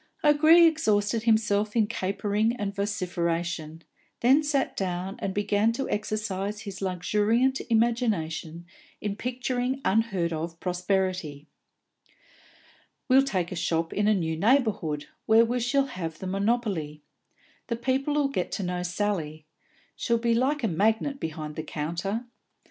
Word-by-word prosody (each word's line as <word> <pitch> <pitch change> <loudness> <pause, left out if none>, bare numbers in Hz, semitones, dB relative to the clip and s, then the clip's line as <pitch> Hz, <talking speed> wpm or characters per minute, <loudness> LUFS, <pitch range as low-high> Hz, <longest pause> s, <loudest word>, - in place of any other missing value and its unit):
O'Gree 310 +3 +7
exhausted 220 -9 +2
himself 215 -2 +2
in 225 -2 +4
capering 205 +2 -1
and 205 -4 -3
vociferation, 175 -5 -2 0.4
then 265 +5 +5
sat 290 -3 0
down 185 0 -3
and 195 - -2
began 205 +2 +1
to 270 +3 -3
exercise 210 -1 -2
his 200 -3 -8
luxuriant 210 +8 +1
imagination 200 -9 0 0.3
in 205 -1 -3
picturing 250 +2 -2
unheard 195 -5 +1
of 165 +1 -5
prosperity. 180 -5 -1 1.6
"We'll 260 +1 +7
take 185 -11 -1
a - - -4
shop 165 -1 -1
in 205 0 +1
a 215 - +4
new 160 -4 -1
neighbourhood, 200 - +1 0.2
where 225 +1 +6
we 245 +2 -1
shall 270 +3 +2
have 165 -10 -5
the 190 - -7
monopoly. 195 -7 -1 0.6
The 235 - -1
people 265 +5 0
'll 280 -1 +2
get 185 -10 -2
to 200 - -2
know 180 0 -2
Sally; 175 -5 -2 0.5
she'll 235 -1 +1
be 230 0 +1
like 265 +4 +1
a - - +3
magnet 220 - +1
behind 155 -1 -5
the - - -3
counter. 170 +9 -3
205 Hz, 135 wpm, -27 LUFS, 175-235 Hz, 1.6 s, O'Gree